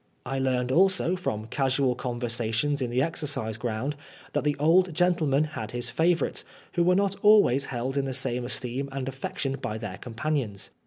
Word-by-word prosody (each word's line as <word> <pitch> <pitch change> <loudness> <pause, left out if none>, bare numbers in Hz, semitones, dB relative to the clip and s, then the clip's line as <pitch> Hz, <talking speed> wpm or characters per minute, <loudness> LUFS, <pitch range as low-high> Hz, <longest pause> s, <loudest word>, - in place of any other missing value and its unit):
I 135 0 -2
learned 130 -1 0
also, 185 +2 +3
from 110 -12 -3
casual 135 +1 +1
conversations 120 +2 -1
in 125 - -1
the 125 +2 +1
exercise 140 -8 -2
ground, 120 +5 -3 0.4
that - - 0
the 145 -1 +1
old 170 +3 +4
gentleman 160 -5 +3
had 150 -8 -5
his 120 0 -2
favorites, 170 +3 +1 0.3
who 175 - +2
were 180 +1 +4
not 200 0 +1
always 205 - +5
held 130 +2 -3
in 140 - +1
the 135 - -3
same 125 -2 +1
esteem 130 +2 -2
and 135 -1 -4
affection 135 +1 -3
by 110 - -3
their 105 -3 -6
companions. 120 -4 -3
135 Hz, 170 wpm, -27 LUFS, 120-155 Hz, 0.4 s, always